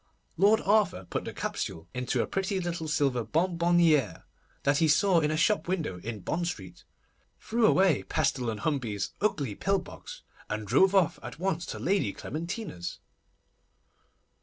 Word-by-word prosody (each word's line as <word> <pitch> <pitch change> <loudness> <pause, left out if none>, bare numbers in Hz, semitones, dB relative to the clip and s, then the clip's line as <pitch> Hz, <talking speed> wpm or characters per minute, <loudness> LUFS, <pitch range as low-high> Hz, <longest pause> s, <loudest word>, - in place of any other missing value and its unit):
Lord 205 +5 +4
Arthur 200 - +2
put - - -3
the - - -4
capsule 80 0 -4
into 125 -1 0
a - - -2
pretty 195 0 -1
little 170 -2 -3
silver 140 -6 +1
bonbonnière 170 - +2 0.4
that 140 +1 +3
he 165 - +4
saw 180 +3 +4
in 150 -2 +1
a 155 - 0
shop 210 +5 +2
window 160 - -2
in 110 +2 -6
Bond 170 - -2
Street, 95 - -7 0.5
threw 230 0 +2
away 185 -8 +4
Pestle 125 -3 0
and 110 -2 -4
Hambey's 115 -10 -2
ugly 145 - 0
pill 195 - +1
box, - - -9 0.3
and 105 0 -3
drove 190 - +4
off 185 -5 +3
at - - -8
once 175 -1 -2
to - - -5
Lady 195 +2 0
Clementina's. 170 - -5
160 Hz, 155 wpm, -28 LUFS, 120-190 Hz, 0.5 s, Lord